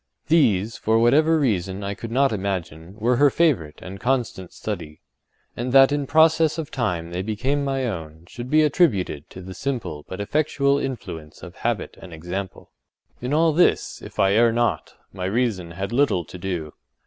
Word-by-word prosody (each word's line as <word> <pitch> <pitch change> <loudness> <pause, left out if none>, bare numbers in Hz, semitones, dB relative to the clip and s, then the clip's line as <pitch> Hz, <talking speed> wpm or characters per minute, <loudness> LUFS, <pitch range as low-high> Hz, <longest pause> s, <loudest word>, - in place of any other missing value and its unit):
These, 115 - +3
for 110 +1 +1
what 120 +2 +4
reason 125 - +2
I 100 0 -2
could 115 +2 -7
not 135 +3 +2
imagine, 95 -3 -4
were 120 +3 +1
her 145 +2 +6
favourite 130 - 0
and 95 +1 -8
constant 120 -8 -1
study—and 95 +9 -8
that 135 0 +7
in 145 -1 -1
process 160 +1 +4
of 160 -3 -5
time 90 -10 -2
they 90 +1 -2
became 125 +8 -1
my 135 -1 -1
own, 80 -7 -6
should 120 +7 -8
be 155 +2 +5
attributed 105 - +1
to 90 - -10
the 95 +1 -8
simple 110 - -4
but 95 - -6
effectual 140 +4 +1
influence 90 - -6
of - - -10
habit - - -2
and 90 -3 -11
example. 90 +4 -6 0.5
In 125 +2 -3
all 160 +1 +3
this, 175 +4 +2
if - - -11
I 95 0 +3
err 115 +2 +5
not, 120 0 -1 0.2
my 95 -1 -4
reason 100 -4 -1
had 95 +5 -5
little 120 - +2
to 90 - -10
do. 85 -5 -4
110 Hz, 170 wpm, -23 LUFS, 90-140 Hz, 0.5 s, that